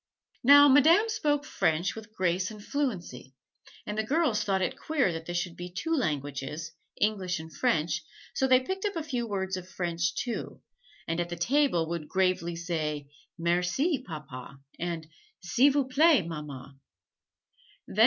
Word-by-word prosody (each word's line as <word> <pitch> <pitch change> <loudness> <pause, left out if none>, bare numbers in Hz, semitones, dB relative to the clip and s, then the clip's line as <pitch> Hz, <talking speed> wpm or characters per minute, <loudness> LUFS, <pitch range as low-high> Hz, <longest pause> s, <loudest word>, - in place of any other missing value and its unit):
Now 285 +3 +9
Madame 320 - +6
spoke 295 -9 0
French 165 - 0
with 220 -1 -10
grace 185 -2 0
and 210 -2 -11
fluency, 180 - -3 0.5
and 210 - -4
the - - +2
girls 260 -4 +1
thought 190 -2 +1
it - - -1
queer 280 - 0
that 165 0 -6
there 175 - -4
should 175 -1 -2
be 175 0 -7
two 325 - -1
languages 150 - -3 0.3
English 190 -5 0
and 160 0 -10
French 160 -9 +1 0.3
so 265 - +1
they 255 -1 +6
picked 380 +8 -4
up 410 -2 -1
a 325 - -2
few 250 -6 -2
words 190 -2 -2
of 185 0 -9
French, 170 -2 -1
too, 240 +2 -4 0.4
and 165 +1 -1
at 175 0 -1
the 175 - -4
table 205 - +2
would 165 -2 -4
gravely 185 -3 +1
say 155 -4 -3 0.3
"Merci, 180 - +1
Papa," 140 -5 -8 0.2
and 170 -2 -3 0.3
"S'il 250 +10 +4
vous 275 -1 +1
plait, 280 - +5
Mamma." 140 -4 -8
185 Hz, 155 wpm, -28 LUFS, 165-265 Hz, 0.5 s, Now